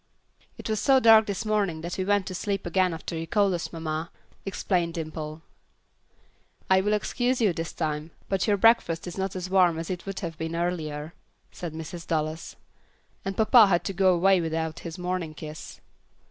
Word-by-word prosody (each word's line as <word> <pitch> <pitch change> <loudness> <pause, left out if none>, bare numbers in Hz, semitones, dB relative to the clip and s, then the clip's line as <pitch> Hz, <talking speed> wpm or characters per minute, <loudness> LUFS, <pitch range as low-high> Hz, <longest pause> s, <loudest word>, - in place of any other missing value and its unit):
"It - - -7
was 215 -1 0
so 270 +3 +5
dark 220 -2 +7
this 200 +2 -3
morning 200 -7 0
that 175 +2 -4
we - - +1
went 200 0 +2
to 185 - -5
sleep 195 +1 -2
again 185 +1 +2
after 165 +1 -5
you 165 0 -4
called 200 -1 +2
us, 170 - -3
mamma," 160 0 -4 0.4
explained 180 -3 -1
Dimple. 155 -1 -6 1.3
"I 190 0 +6
will 210 +2 +1
excuse 245 +4 0
you 210 -6 +3
this 165 -1 -4
time, 155 -1 -3 0.2
but 195 +1 0
your 205 -1 +3
breakfast 195 -6 +3
is 175 - -6
not 190 0 -3
as 185 -1 -4
warm 185 -3 +4
as 165 +2 -4
it 180 +1 -6
would 195 +1 -4
have 165 -4 -5
been 160 +1 -3
earlier," 160 -3 -3 0.4
said 170 -3 -6
Mrs. 160 +1 -7
Dallas, 155 0 -2 0.7
"and 195 0 -4
papa 220 0 +7
had 175 -3 +2
to 195 - -3
go 190 0 +4
away 190 +1 +4
without 160 0 -2
his 165 -2 -7
morning 180 -3 -3
kiss." 155 0 -9
175 Hz, 190 wpm, -26 LUFS, 160-195 Hz, 1.3 s, dark